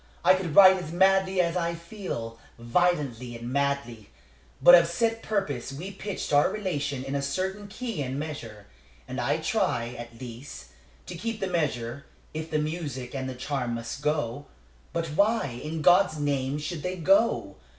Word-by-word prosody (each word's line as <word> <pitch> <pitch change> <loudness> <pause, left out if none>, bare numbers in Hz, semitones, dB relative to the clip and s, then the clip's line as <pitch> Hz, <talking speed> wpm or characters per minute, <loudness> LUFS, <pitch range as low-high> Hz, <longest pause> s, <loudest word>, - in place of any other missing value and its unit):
I 185 - +8
could 185 -5 -2
write 190 -1 +8
as 155 - -7
madly 190 +1 +3
as 170 0 0
I 170 -1 0
feel 170 - -6 0.2
violently 125 -2 0
and 120 +2 -6
madly. 140 -6 -1 0.5
But 175 - +8
of 170 -1 +8
set 225 +7 0
purpose 150 - -2
we 170 +8 -6
pitched 195 -4 -5
our 145 0 +5
relation 145 -10 -2
in 135 +1 -5
a 140 - 0
certain 190 +8 -3
key 220 -4 -4
and 135 0 -3
measure; 120 -9 -6 0.4
and - - -4
I - - +1
try, 115 0 0
at 120 -1 -9
least, 120 - -9 0.4
to - - -7
keep 225 +5 -4
the 195 - -1
measure, 140 -7 -2 0.3
if 155 +1 -5
the 155 - 0
music 150 -5 -3
and 130 -1 -3
the 130 - -6
charm 125 -2 -2
must 115 +3 -6
go. 145 -3 -1 0.4
But 170 -1 -1
why, 150 - +1
in 155 0 -4
God's 180 -2 +5
name, 140 -1 -1
should 155 +1 -4
they 180 +3 -3
go? 185 - +2
150 Hz, 170 wpm, -27 LUFS, 130-185 Hz, 0.5 s, I